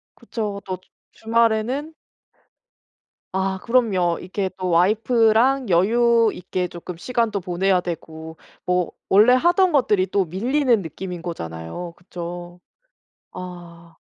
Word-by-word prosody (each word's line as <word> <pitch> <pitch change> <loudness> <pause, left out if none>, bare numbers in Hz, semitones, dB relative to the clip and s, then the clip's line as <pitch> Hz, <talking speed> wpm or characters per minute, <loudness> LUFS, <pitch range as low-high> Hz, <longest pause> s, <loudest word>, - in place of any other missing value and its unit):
그쵸. 205 -3 -5
또 185 -1 -4
주 - - -31 0.3
주말에는 230 +6 +1 1.4
아 190 0 -1
그럼요. 200 -9 +2
이렇게 190 +1 -3
또 185 -1 -2
와이프랑 225 +7 +3
여유 230 +5 +4
있게 180 0 -3
쪼끔 175 0 -9
시간도 230 -1 -1
보내야 185 +1 +1
되고 160 -2 -7 0.3
뭐 180 -1 0 0.2
원래 215 +6 +6
하던 350 +7 +4
것들이 210 - +2
또 195 0 +1
밀리는 235 - +1
느낌인 180 +1 -7
거잖아요. 160 - -6
그쵸? 175 0 -8 0.7
아. 175 -2 -10
190 Hz, 240 characters per minute, -22 LUFS, 175-230 Hz, 1.4 s, 원래